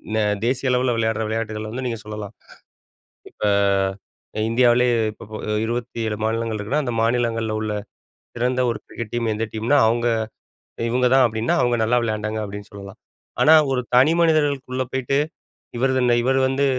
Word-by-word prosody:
ந -, -, +1 dB, 0.3 s
தேசிய 130 Hz, +2 st, 0 dB
அளவுல 125 Hz, 0 st, +2 dB
விளையாட்ற 110 Hz, -1 st, 0 dB
விளையாட்டுகள 110 Hz, -1 st, -3 dB
வந்து 130 Hz, +3 st, -4 dB
நீங்க 115 Hz, -2 st, -3 dB
சொல்லலாம். 105 Hz, -1 st, -7 dB, 1.0 s
இப்ப -, -, -40 dB, 1.0 s
அ -, -, 0 dB
இந்தியாவிலேயே 120 Hz, +1 st, +4 dB, 0.2 s
இப்ப 115 Hz, -, -12 dB
ப -, -, -6 dB, 0.3 s
27 115 Hz, -2 st, -3 dB
மாநிலங்கள் 115 Hz, 0 st, -1 dB
இருக்குன்னா, 135 Hz, +9 st, -1 dB
அந்த 120 Hz, -2 st, -3 dB
மாநிலங்கள்ல 115 Hz, -1 st, 0 dB
உள்ள 110 Hz, -1 st, -2 dB, 0.6 s
சிறந்த 125 Hz, +1 st, 0 dB
ஒரு 115 Hz, -, -2 dB
கிரிக்கெட் 115 Hz, -3 st, -7 dB
டீம் 115 Hz, -2 st, 0 dB
எந்த 110 Hz, +2 st, -2 dB
டீம்னா, 115 Hz, +6 st, +2 dB
அவுங்க 120 Hz, +1 st, +1 dB, 0.8 s
இவுங்க 125 Hz, +1 st, +2 dB
தான் 135 Hz, -1 st, +6 dB
அப்டீன்னா, 115 Hz, +8 st, -1 dB
அவுங்க 120 Hz, -1 st, +2 dB
நல்லா 120 Hz, +3 st, +2 dB
விளையாண்டாங்க 110 Hz, -1 st, -2 dB
அப்டீன்னு 100 Hz, 0 st, -8 dB
சொல்லலாம். 100 Hz, +1 st, -10 dB, 0.4 s
ஆனா, 155 Hz, -, +7 dB, 0.2 s
ஒரு 130 Hz, -1 st, +1 dB
தனி 130 Hz, +5 st, +6 dB
மனிதர்களுக்குள்ள 145 Hz, -6 st, +1 dB
போயிட்டு, 130 Hz, +1 st, 0 dB, 0.6 s
இவரதுன்ன 130 Hz, -1 st, +2 dB
இவர் 130 Hz, +2 st, +1 dB
வந்து 135 Hz, +2 st, +1 dB
120 Hz, 150 wpm, -22 LUFS, 110-130 Hz, 1.0 s, ஆனா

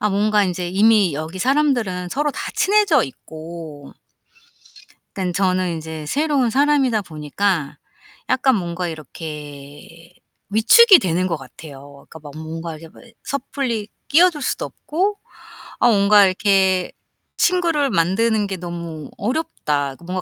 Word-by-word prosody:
아 210 Hz, -, +1 dB
뭔가 210 Hz, +1 st, +2 dB
인제 180 Hz, -1 st, -3 dB
이미 200 Hz, -2 st, +3 dB
여기 155 Hz, +5 st, -6 dB
사람들은 240 Hz, -8 st, 0 dB
서로 295 Hz, +6 st, 0 dB
다 -, -, -7 dB
친해져 395 Hz, -, +3 dB
있고 155 Hz, 0 st, -10 dB, 1.3 s
약간 185 Hz, -2 st, -2 dB
저는 185 Hz, -1 st, 0 dB
인제 160 Hz, -1 st, -7 dB
새로운 285 Hz, -, +1 dB
사람이다 270 Hz, -4 st, +2 dB
보니까 155 Hz, -1 st, -2 dB, 0.5 s
약간 260 Hz, -1 st, +3 dB
뭔가 175 Hz, -2 st, -3 dB
이렇게 150 Hz, 0 st, -10 dB, 0.4 s
위축이 370 Hz, -, +7 dB
되는 180 Hz, 0 st, 0 dB
것 165 Hz, -, -1 dB
같아요. 140 Hz, +1 st, -13 dB
그러니까 160 Hz, -, -11 dB
막 145 Hz, -2 st, -10 dB
뭔가 160 Hz, +1 st, -6 dB
이렇게 165 Hz, +1 st, -13 dB
뭐 -, -, -16 dB, 0.2 s
섣불리 255 Hz, -5 st, -3 dB, 0.2 s
끼어들 330 Hz, 0 st, +4 dB
수도 -, -, -2 dB
없고 390 Hz, +6 st, -2 dB, 0.6 s
아 -, -, +5 dB
뭔가 205 Hz, -1 st, +5 dB
이렇게 190 Hz, -1 st, +2 dB, 0.5 s
친구를 335 Hz, -6 st, +1 dB
만드는 205 Hz, +3 st, +1 dB
게 195 Hz, -, -4 dB
너무 170 Hz, -3 st, -7 dB
어렵다. 175 Hz, -, -2 dB
뭔가 185 Hz, +1 st, -3 dB
185 Hz, 280 characters per minute, -20 LUFS, 160-250 Hz, 1.3 s, 위축이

